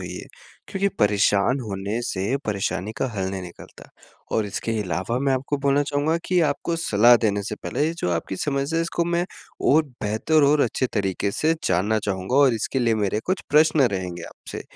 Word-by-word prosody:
होइए - - -7 0.4
क्योंकि 200 0 0
परेशान 105 +4 +3
होने 100 0 -3
से 105 +2 -1
परेशानी 100 0 -2
का 135 - 0
हल 95 -1 -1
नहीं 95 -1 -4
निकलता। 85 -1 -12 0.4
और 110 -2 +1
इसके 105 +3 -3
अलावा 95 +6 -2
मैं 135 +1 +1
आपको 135 +2 -1
बोलना 140 +1 +3
चाहूँगा 145 +3 0
कि 180 -1 +2
आपको 165 +4 -3
सलाह 120 -5 +5
देने 100 -1 +1
से 105 +2 -4
पहले 105 +9 -2
ये 165 - -1
जो 90 - -1
आपकी 85 +2 -2
समस्या 140 - -1
है - - +2
इसको 170 0 -1
मैं 170 +1 0 0.5
और 155 +3 +5 0.2
बेहतर 110 +9 +2
और 145 +1 +4
अच्छे 130 - +1
तरीक़े 100 -1 -1
से 155 +10 +1
जानना 100 +5 +2
चाहूँगा 95 +4 -1
और 140 -4 +5
इसके 115 +4 -2
लिए 115 -3 +2
मेरे 105 0 0
कुछ 185 +1 -1
प्रश्न 155 0 +5
रहेंगे 90 -2 -4
आपसे। - - -9
115 Hz, 185 wpm, -23 LUFS, 100-145 Hz, 0.5 s, सलाह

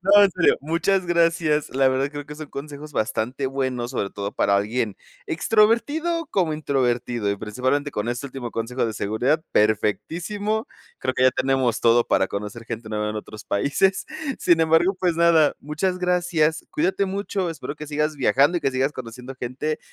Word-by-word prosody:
No, 200 +2 +7
en 200 - +5
serio, 180 -1 +3
muchas 170 +6 +1
gracias, 165 -3 +2
la 135 +1 +3
verdad, 135 +2 0
creo 145 -1 -6
que 150 - -9
son 155 0 -8
consejos 145 +1 -8
bastante 125 +3 -1
buenos, 130 -2 -2
sobre 110 -6 -2
todo 100 0 -5
para 100 0 +2
alguien 105 +1 -1 0.3
extrovertido 235 - +2
como 175 -5 +1
introvertido 125 -6 0
y 100 - -1
principalmente 130 +7 -1
con 105 -3 -3
este 120 +3 -3
último 130 -3 -6
consejo 115 +2 -1
de 110 - -3
seguridad, 125 +11 0
perfectísimo. 170 - 0 0.3
Creo 130 0 -1
que 130 - +2
ya 130 - +7
tenemos 130 -4 +1
todo 120 0 +4
para 95 - +2
conocer 105 +3 -5
gente 115 -1 -6
nueva 105 0 -2
en 110 - -5
otros 105 0 -8
países. 145 - +1 0.3
Sin 170 -2 +3
embargo, 165 +4 +4
pues 175 -3 +1
nada, 165 -3 +4
muchas 180 +5 -2
gracias. 175 -3 +1
Cuídate 185 +5 +1
mucho. 195 -2 -2
Espero 155 -2 -6
que 150 - -8
sigas 150 +1 -1
viajando 140 +6 +3
y - - -14
que 135 - +1
sigas 135 +2 0
conociendo 125 0 -8
gente 130 +5 -3
140 Hz, 175 wpm, -23 LUFS, 120-170 Hz, 0.3 s, No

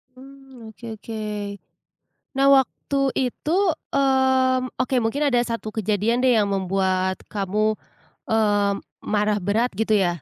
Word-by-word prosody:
Mmm, 265 -3 -13
oke 235 - -14
oke. 220 +1 -7 1.1
Nah, 275 0 +3
waktu 270 +1 -1 0.3
itu, 300 - -6 0.4
mmm, 260 -2 +2
oke, 255 +1 -1
mungkin 240 +6 -1
ada 245 -2 +2
satu 230 -2 -4
kejadian 215 +3 0
deh 255 -1 +5
yang 205 -2 +2
membuat 190 -1 0
kamu, 210 +2 0 0.5
eee, 205 -2 +2 0.3
marah 210 0 +1
berat, 220 +6 0
gitu 220 0 +2
ya? 175 -5 0
220 Hz, 125 wpm, -23 LUFS, 205-260 Hz, 1.1 s, deh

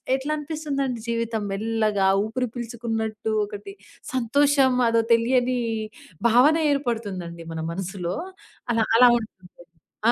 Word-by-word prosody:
ఎట్లా 275 +3 -3
అనిపిస్తుందండి 285 -5 -3
జీవితం 230 -1 -1
మెల్లగా 215 -1 0 0.2
ఊపిరి 250 +3 -2
పీల్చుకున్నట్టు 225 -2 -3
ఒకటి, 205 -1 -9 0.4
సంతోషం 270 +2 +3
అదో 230 0 +3
తెలియని 250 +2 +2 0.7
భావన 270 +8 +5
ఏర్పడుతుందండి 200 - -3
మన 160 - -5
మనసులో. 185 -1 -4 0.6
అలా 225 -1 +2
అలా 250 +1 +8
ఉంటుంది. 185 -5 -12 0.6
ఆ! - - +7
230 Hz, 105 wpm, -24 LUFS, 210-255 Hz, 0.7 s, అలా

